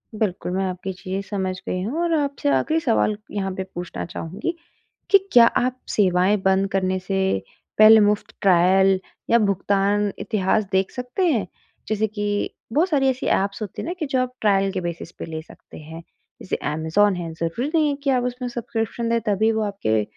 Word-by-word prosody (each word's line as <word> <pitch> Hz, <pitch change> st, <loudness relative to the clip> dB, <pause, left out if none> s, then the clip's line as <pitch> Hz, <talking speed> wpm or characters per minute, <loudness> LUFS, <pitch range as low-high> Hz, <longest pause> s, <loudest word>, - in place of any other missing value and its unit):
बिल्कुल, 195 Hz, -4 st, -2 dB
मैं 190 Hz, +1 st, 0 dB
आपकी 185 Hz, +1 st, -4 dB
चीज़ें 190 Hz, +1 st, -5 dB
समझ 190 Hz, -2 st, -2 dB
गई 185 Hz, -, -2 dB
हूँ 270 Hz, -, -2 dB
और 340 Hz, -1 st, +1 dB
आपसे 285 Hz, 0 st, -1 dB
आख़िरी 315 Hz, +2 st, +2 dB
सवाल 225 Hz, -5 st, +1 dB
यहाँ 195 Hz, -2 st, -2 dB
पे 190 Hz, -, -3 dB
पूछना 175 Hz, 0 st, -5 dB
चहूँगी, 180 Hz, -, -4 dB, 0.6 s
कि 400 Hz, -, +8 dB, 0.2 s
क्या 240 Hz, -1 st, +9 dB
आप 255 Hz, +2 st, 0 dB
सेवाएँ 190 Hz, 0 st, +3 dB
बंद 190 Hz, 0 st, +3 dB
करने 185 Hz, -1 st, 0 dB
से 195 Hz, +1 st, -3 dB, 0.6 s
पहले 215 Hz, +1 st, +9 dB
मुफ़्त 210 Hz, 0 st, +1 dB
ट्रायल, 190 Hz, +1 st, +4 dB, 0.3 s
या 235 Hz, -, +6 dB
भुगतान 200 Hz, 0 st, +1 dB
इतिहास 215 Hz, 0 st, +1 dB
देख 190 Hz, 0 st, +1 dB
सकते 250 Hz, +9 st, -2 dB
हैं? 230 Hz, -, +1 dB, 0.4 s
जैसे 215 Hz, 0 st, 0 dB
कि 205 Hz, -1 st, -2 dB, 0.2 s
बहुत 330 Hz, +8 st, +2 dB
सारी 275 Hz, -5 st, +2 dB
ऐसी 260 Hz, 0 st, -2 dB
ऐप्स 200 Hz, +2 st, 0 dB
होती 210 Hz, -, -5 dB
हैं -, -, -6 dB
ना 350 Hz, -, -2 dB
कि 310 Hz, -, -1 dB
जो 265 Hz, -2 st, 0 dB
आप 250 Hz, 0 st, -3 dB
ट्रायल 195 Hz, -2 st, +2 dB
बेसिस 170 Hz, -1 st, -5 dB
पे -, -, -8 dB
ले 160 Hz, -1 st, -6 dB
सकते 160 Hz, -, -15 dB
हैं, 160 Hz, +2 st, -10 dB, 0.4 s
जैसे -, -, -2 dB, 0.2 s
अमेज़न 160 Hz, +6 st, +2 dB
है 170 Hz, -2 st, -5 dB
ज़रूरी 170 Hz, -, -2 dB
नहीं 310 Hz, -2 st, +4 dB
है 285 Hz, -, -1 dB
कि 280 Hz, -, +1 dB
आप 255 Hz, -2 st, +2 dB
उसमें 250 Hz, 0 st, -3 dB
सब्सक्रिप्शन 230 Hz, -1 st, -3 dB
ले 230 Hz, 0 st, +2 dB
तभी 215 Hz, +2 st, +2 dB
वो 220 Hz, 0 st, -1 dB
आपके 110 Hz, -, 0 dB
205 Hz, 185 wpm, -22 LUFS, 185-240 Hz, 0.6 s, क्या